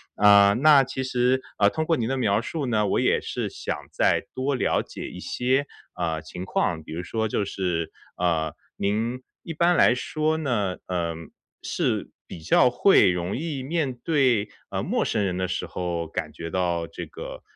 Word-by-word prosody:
呃， 100 -1 +7
那 140 +1 +6
其 130 0 -4
实， 130 0 +1 0.2
呃， 100 -1 +5
通 160 +8 -2
过 165 0 +2
您 115 - -1
的 135 +2 -1
描 105 -5 +2
述 145 +3 -4
呢， 105 -3 +1
我 - - +1
也 - - +3
是 - - -3
想 - - -4 0.2
再 - - +2
多 135 +2 0
了 - - +1
解 - - -8
一 90 - -9
些， 130 +5 0 0.3
呃， 80 -3 -2
情 90 +3 -8
况， 85 -3 -1
比 80 - -9
如 85 - -3
说 110 +3 -1
就 105 - -1
是， 90 -4 -2 0.3
呃， 80 -3 0 0.2
您 115 +5 -1 0.2
一 165 - -6
般 175 +2 +3
来 125 - +5
说 155 +4 -1
呢， 105 -11 -1
呃， 85 -3 -2 0.5
是 - - -1 0.2
比 85 - -9
较 85 +9 +4
会 125 - +5
容 90 +1 -2
易 145 -2 -3
面 150 -1 -1
对， 130 -10 +2 0.2
呃， - - -2
陌 - - 0
生 105 -3 0
人 90 -2 -1
的 95 - -1
时 90 - -3
候， 85 -2 -3
感 - - -4
觉 85 0 -7
到 85 -2 0
这 - - -8
个， - - -8
105 Hz, 200 characters per minute, -25 LUFS, 90-135 Hz, 0.5 s, 呃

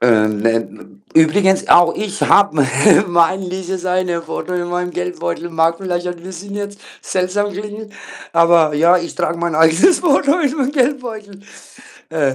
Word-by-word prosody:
ähm, 110 -3 +2
ne 110 -3 -3 0.2
übrigens 190 +5 +3
auch 175 -1 +5
ich 205 -1 -5
habe 200 -5 +3
me 140 - +3 0.4
mein 180 +2 +1
dieses 185 0 -5 0.4
Foto 180 - -6
in 175 0 -3
meinem 180 0 -3
Geldbeutel. 90 - -5
Mag 165 0 +1
vielleicht 180 -2 -4
ein 175 - -5
bisschen 190 +2 -9
jetzt 205 0 -6 0.2
seltsam 195 +2 -2
klingen, 210 +2 -8 0.4
aber, 170 -2 +3
ja, 170 +4 +4
ich 170 -1 -7
trage 170 - -2
mein 170 -1 -2
eigenes 165 - +4
Foto 290 -1 +2
in 285 -4 0
meinem 275 -1 -1
Geldbeutel. 240 -8 -3 0.7
Äh 145 -5 0
180 Hz, 150 wpm, -17 LUFS, 160-205 Hz, 0.7 s, auch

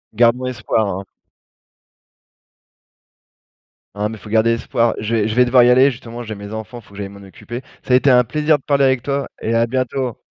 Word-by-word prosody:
Gardons 120 +3 +3
espoir, 110 -2 -1
hein. 95 0 -4 2.9
Hein, 105 +1 -1
mais 110 - -7
faut 105 - -12
garder 110 +1 +3
espoir. 115 0 0
Je 110 +2 -2
vais 110 -2 +1
je 110 - -2
vais 125 0 +5
devoir 125 0 +5
y 120 - +5
aller 130 +3 +6
justement. 120 -1 -8
J'ai 110 -1 -6
mes 100 0 -9
enfants, 110 +2 -7
faut 110 - -19
que 100 - -13
j'aille 100 -1 -5
m'en 100 0 -13
occuper. 120 +5 -8 0.2
Ça 125 - -1
a - - +8
été 135 +1 +3
un 125 0 +5
plaisir 150 +4 +1
de - - -28
parler 140 -1 +2
avec 130 -2 +2
toi 140 +2 -2
et 115 - -1
à 115 0 +3
bientôt. 130 0 -2
120 Hz, 210 wpm, -19 LUFS, 110-130 Hz, 2.9 s, a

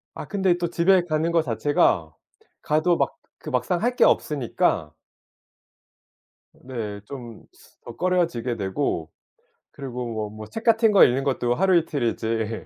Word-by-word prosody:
아 - - -6
근데 190 -4 +1
또 175 -1 -2
집에 175 +2 +3
가는 160 0 0
거 170 -1 +3
자체가 115 - +1 0.5
가도 155 +3 +2
막 - - -1 0.3
그 - - -6
막상 180 -2 -1
할 245 +2 0
게 - - +4
없으니까 125 - +1 1.6
네. 115 -5 -6
좀 120 -3 -10 0.4
더 120 - -9
꺼려지게 170 -10 0
되고 95 - -2 0.6
그리고 125 -3 -6
뭐 110 -2 -3
뭐 110 +1 -9
책 225 - -7
같은 225 -1 +4
거 200 - +7
읽는 130 +2 +1
것도 125 -3 0
하루 190 +2 +3
이틀이지 115 -7 -2
140 Hz, 245 characters per minute, -24 LUFS, 115-175 Hz, 1.6 s, 거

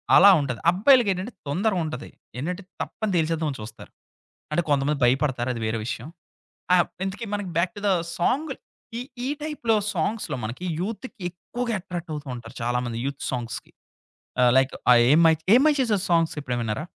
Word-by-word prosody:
అలా 200 - +9
ఉంటది. 125 -5 -3
అబ్బాయిలకేంటంటే 205 0 +3
తొందర 195 +10 +1
ఉంటది. 155 -4 -5 0.3
ఏంటంటే 180 +9 -3 0.2
తప్పన 220 - -3
తెలిసేద్దాంని 160 -3 0
చూస్తారు. 105 - -10 0.6
అంటే 150 - +2
కొంతమంది 145 0 +1
భయపడతారది 125 -1 +1
వేరే 110 +1 -1
విషయం. 120 +2 -4 0.7
ఆహ్, 175 -2 +5 0.2
ఇంతకీ 200 +4 -4
మనకి 205 -2 -2
బ్యాక్ 170 +1 +2
టు - - -6
ద - - +4 0.3
సాంగు 275 - +1
ల్ - - -29 0.4
ఈ - - -3 0.2
ఈ - - -1
టైప్‌లో 295 -7 0 0.2
సాంగ్స్‌లో 205 +3 -1
మనకి, 120 +11 -5
యూత్తుకి 225 +6 -5
ఎక్కువగా 235 +7 -4
అట్రాక్టవుతా 170 -6 -6
ఉంటారు 120 +1 -10
చాలామంది 120 0 -1
యూత్ 140 0 -4
సాంగ్స్‌కి. 120 -2 -5 0.7
ఆహ్, 125 -1 +6
లైక్ 135 0 +3 0.2
ఆహ్, 120 -1 +7
ఏం 155 - +6
మై 160 - +6 0.2
'ఏం 250 - +7
మై 305 - +5
చేసవే' 215 -7 +1
సాంగ్సెప్పుడైన 150 -7 +1
విన్నారా? 110 +7 -3
165 Hz, 155 wpm, -25 LUFS, 130-205 Hz, 0.7 s, అలా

